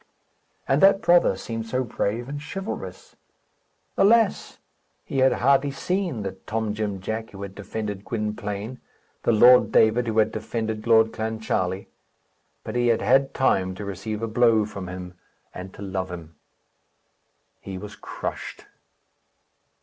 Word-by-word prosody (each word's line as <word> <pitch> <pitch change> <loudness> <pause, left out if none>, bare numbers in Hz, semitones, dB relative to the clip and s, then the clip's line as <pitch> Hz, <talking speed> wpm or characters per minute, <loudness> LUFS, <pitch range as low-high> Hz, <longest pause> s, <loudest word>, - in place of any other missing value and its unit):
And 135 +2 +2
that 195 0 +6
brother 175 - +4
seemed 115 +2 -5
so 130 +3 0
brave 115 0 -2
and 145 +1 -5
chivalrous! 195 +6 -7 0.8
Alas! 220 +1 +3 0.5
he 135 - -2
had 130 0 +5
hardly 140 +2 +3
seen 175 - -2
the 95 - -3
Tom 105 +3 -3
Jim 105 -2 -3
Jack 110 +3 -4
who 100 0 -9
had 100 -1 -7
defended 105 -1 -5
Gwynplaine, 105 +1 -4 0.4
the - - +2
Lord 115 0 +6
David 115 +2 +4
who 110 -1 -2
had 110 0 +4
defended 110 0 -4
Lord 110 -1 +5
Clancharlie; 110 -4 -2 0.8
but - - -6
he 120 0 +2
had 115 -1 +2
had 135 0 +3
time 95 -8 +1
to 105 - -6
receive 105 +3 -5
a - - 0
blow 115 -1 +3
from 100 -3 -7
him 90 0 -7 0.4
and 95 +1 -8
to - - -8
love 95 -1 -3
him. 85 -2 -8 1.3
He 95 -1 -7
was 105 +2 -8
crushed. - - -6
110 Hz, 140 wpm, -24 LUFS, 100-125 Hz, 1.3 s, that